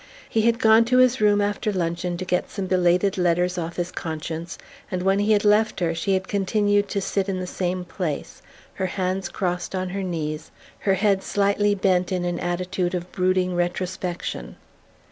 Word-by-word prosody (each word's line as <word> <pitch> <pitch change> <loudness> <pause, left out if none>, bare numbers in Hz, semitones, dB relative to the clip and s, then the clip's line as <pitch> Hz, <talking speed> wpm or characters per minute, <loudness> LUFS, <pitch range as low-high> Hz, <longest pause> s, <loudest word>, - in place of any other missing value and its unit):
He 225 - +1
had 230 +1 +3
gone 220 0 +6
to 250 +2 +2
his 255 -1 +4
room 205 -1 +4
after 205 +1 0
luncheon 175 -1 -2
to 185 - -4
get 180 -1 0
some 195 -2 -4
belated 185 +1 +2
letters 180 +1 +1
off 170 0 -4
his 175 0 -2
conscience; 165 +1 -5 0.3
and 180 -1 -2
when 195 +1 +3
he 205 +1 +2
had 205 0 +2
left 210 +1 +3
her 170 -2 +1
she 190 +4 0
had 190 0 -2
continued 205 0 +1
to 200 - -1
sit 195 0 -1
in 185 -1 -1
the 185 - -3
same 180 0 -2
place, 175 -5 -4 0.3
her 190 - -2
hands 185 0 -2
crossed 180 0 -2
on 185 0 -2
her 195 +2 -3
knees, 155 -4 -3 0.3
her 195 -1 +2
head 195 -1 +2
slightly 205 +1 +1
bent, 185 -2 +1
in 180 -1 -1
an 175 0 -2
attitude 180 +1 -1
of 175 0 -5
brooding 185 -1 +1
retrospection. 175 - -3
185 Hz, 185 wpm, -24 LUFS, 175-200 Hz, 0.3 s, gone